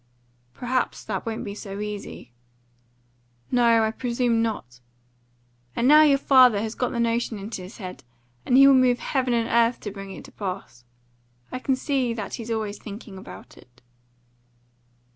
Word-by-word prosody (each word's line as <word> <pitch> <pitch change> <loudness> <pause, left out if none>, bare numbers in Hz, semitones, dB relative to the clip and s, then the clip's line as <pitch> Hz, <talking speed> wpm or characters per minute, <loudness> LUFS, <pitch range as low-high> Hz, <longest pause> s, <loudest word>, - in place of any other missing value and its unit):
"Perhaps 250 0 -2
that - - -4
won't 225 0 -3
be 200 - -5
so 200 -1 -7
easy." 210 - -7 1.2
"No, 235 -2 +4
I 220 - +1
presume 235 -1 0
not. 125 - -4 1.0
And 240 - +1
now 300 +2 +8
your 290 -3 +5
father 255 -6 +5
has 220 +1 -3
got 250 - -1
the 235 - -4
notion 235 -1 0
in 200 +2 -8
his 185 -1 -7
head, 185 -4 -8 0.4
and 250 - +3
he 275 - +9
will 275 - +8
move 255 -2 +4
heaven 255 -3 -1
and 230 -1 0
earth 235 +1 +2
to 205 - -5
bring 195 0 -9
it 190 - -9
to - - -14
pass. 185 - -7 0.7
I 255 - -4
can 265 +1 0
see 260 -3 -1
that 210 -4 -6
he's 230 -1 -6
always 215 -2 -3
thinking 205 -2 -9
about - - -12
it." 125 0 -22
230 Hz, 165 wpm, -24 LUFS, 205-250 Hz, 1.2 s, he